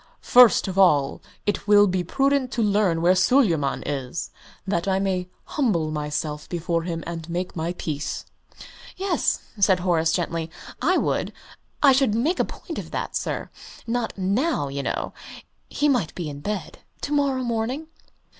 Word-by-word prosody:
"First 245 Hz, -4 st, +6 dB
of 190 Hz, 0 st, -2 dB
all, 150 Hz, -8 st, +4 dB, 0.2 s
it 205 Hz, 0 st, -1 dB
will 205 Hz, 0 st, +7 dB
be 185 Hz, -2 st, 0 dB
prudent 275 Hz, +5 st, +1 dB
to 235 Hz, -, +1 dB
learn 200 Hz, -5 st, +2 dB
where 180 Hz, +2 st, +6 dB
Suleyman 180 Hz, -, +2 dB
is, 140 Hz, +1 st, -4 dB, 0.3 s
that 180 Hz, -2 st, -1 dB
I 190 Hz, -1 st, +2 dB
may 185 Hz, -2 st, -1 dB
humble 180 Hz, -, 0 dB
myself 150 Hz, 0 st, -3 dB
before 170 Hz, -1 st, -1 dB
him 165 Hz, -1 st, -4 dB
and 165 Hz, -1 st, -6 dB
make 180 Hz, +2 st, -3 dB
my 165 Hz, +1 st, -2 dB
peace." 150 Hz, -4 st, -4 dB, 0.7 s
"Yes," 380 Hz, -1 st, 0 dB, 0.2 s
said 190 Hz, -2 st, +4 dB
Horace, 165 Hz, -3 st, +2 dB
gently, 165 Hz, -1 st, -2 dB, 0.3 s
"I -, -, +3 dB
would. -, -, 0 dB, 0.5 s
I 280 Hz, -, +8 dB
should 260 Hz, -5 st, +3 dB
make 305 Hz, +11 st, +1 dB
a -, -, +3 dB
point -, -, -7 dB
of -, -, -7 dB
that, -, -, -4 dB
sir. -, -, -3 dB, 0.3 s
Not 235 Hz, -1 st, -2 dB
now, 195 Hz, -, 0 dB
you 140 Hz, +1 st, -3 dB
know. -, -, -3 dB, 0.6 s
He 295 Hz, -, +1 dB
might 245 Hz, -, +1 dB
be 165 Hz, -4 st, -4 dB
in 140 Hz, -, -8 dB
bed. 205 Hz, +6 st, -4 dB, 0.2 s
To 285 Hz, -, -4 dB
morrow 275 Hz, -3 st, +1 dB
morning." 240 Hz, +5 st, -2 dB
185 Hz, 160 wpm, -24 LUFS, 165-240 Hz, 0.7 s, I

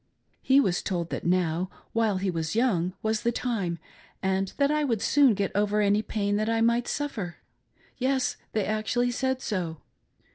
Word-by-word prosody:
He 270 Hz, +1 st, +5 dB
was 185 Hz, -10 st, +2 dB
told 170 Hz, -3 st, -3 dB
that -, -, -3 dB
now 180 Hz, 0 st, +1 dB, 0.2 s
while 225 Hz, -4 st, +2 dB
he 190 Hz, 0 st, -1 dB
was 165 Hz, 0 st, -3 dB
young 185 Hz, -7 st, +1 dB
was 220 Hz, 0 st, 0 dB
the 235 Hz, -, +1 dB
time, 210 Hz, -9 st, -2 dB, 0.5 s
and 190 Hz, 0 st, 0 dB
that 280 Hz, 0 st, +3 dB
I 300 Hz, 0 st, +1 dB
would 235 Hz, -7 st, 0 dB
soon 270 Hz, 0 st, +4 dB
get 200 Hz, -1 st, -1 dB
over 210 Hz, +1 st, +1 dB
any 205 Hz, 0 st, +3 dB
pain 205 Hz, -2 st, -1 dB
that 215 Hz, +1 st, 0 dB
I 230 Hz, 0 st, +1 dB
might 235 Hz, +1 st, +2 dB
suffer. 220 Hz, -12 st, -3 dB, 0.6 s
Yes, 260 Hz, 0 st, +1 dB, 0.2 s
they 215 Hz, -3 st, +1 dB
actually 215 Hz, +3 st, 0 dB
said 260 Hz, +1 st, -1 dB
so. 175 Hz, -6 st, -2 dB
215 Hz, 175 wpm, -27 LUFS, 185-245 Hz, 0.6 s, He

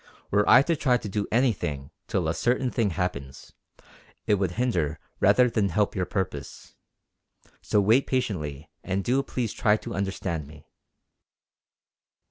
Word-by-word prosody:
Were 105 Hz, +1 st, +2 dB
I 125 Hz, +4 st, +8 dB
to 165 Hz, +3 st, +1 dB
try 130 Hz, -4 st, +2 dB
to 115 Hz, -, -7 dB
do 105 Hz, +1 st, -2 dB
anything 90 Hz, -, 0 dB, 0.2 s
till 90 Hz, -4 st, -1 dB
a 80 Hz, -, +1 dB
certain 125 Hz, -, 0 dB
thing 115 Hz, -4 st, +1 dB
happens, 70 Hz, -7 st, -5 dB, 0.7 s
it -, -, +2 dB
would 95 Hz, -3 st, -1 dB
hinder 90 Hz, -, 0 dB, 0.2 s
rather 125 Hz, -1 st, +5 dB
than 110 Hz, -4 st, 0 dB
help 105 Hz, 0 st, 0 dB
your 90 Hz, -2 st, -1 dB
purpose. 95 Hz, -3 st, -5 dB, 0.9 s
So 105 Hz, -, +1 dB
wait 110 Hz, +7 st, +3 dB
patiently 80 Hz, -, -2 dB, 0.2 s
and 95 Hz, +1 st, -2 dB
do 130 Hz, +5 st, +2 dB
please 120 Hz, -5 st, -3 dB
try 105 Hz, 0 st, +2 dB
to -, -, -7 dB
understand 95 Hz, -6 st, -3 dB
me." 75 Hz, 0 st, -15 dB
100 Hz, 145 wpm, -26 LUFS, 85-120 Hz, 0.9 s, I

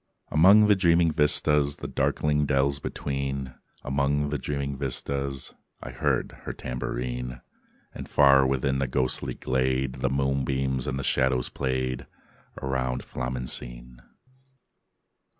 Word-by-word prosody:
III -, -, -5 dB
Among 100 Hz, +5 st, +8 dB
the 105 Hz, -1 st, +5 dB
dreaming 85 Hz, -3 st, +3 dB
vistas, 75 Hz, -1 st, +3 dB
The -, -, -6 dB
darkling 75 Hz, -1 st, 0 dB
dells 70 Hz, 0 st, +1 dB
between, 70 Hz, -2 st, -4 dB, 0.3 s
Among 70 Hz, +2 st, 0 dB
the 75 Hz, -1 st, -2 dB
dreaming 70 Hz, 0 st, -3 dB
vistas 70 Hz, 0 st, -3 dB, 0.3 s
I 60 Hz, -, -8 dB
heard 65 Hz, -, 0 dB
her -, -, -4 dB
tambourine: 60 Hz, 0 st, -4 dB, 0.5 s
And -, -, -8 dB
far 70 Hz, -2 st, +5 dB
within 65 Hz, 0 st, 0 dB
the 70 Hz, -, 0 dB
ghostly 65 Hz, 0 st, -1 dB
glade 65 Hz, 0 st, -1 dB
The 65 Hz, -, +1 dB
moonbeams 65 Hz, -1 st, 0 dB
and 65 Hz, -, -2 dB
the 70 Hz, -, -3 dB
shadows 65 Hz, -1 st, +1 dB
played 65 Hz, -1 st, -2 dB, 0.5 s
Round 65 Hz, -1 st, -2 dB
Flamencine. 60 Hz, -1 st, -5 dB
65 Hz, 120 wpm, -26 LUFS, 65-70 Hz, 0.5 s, Among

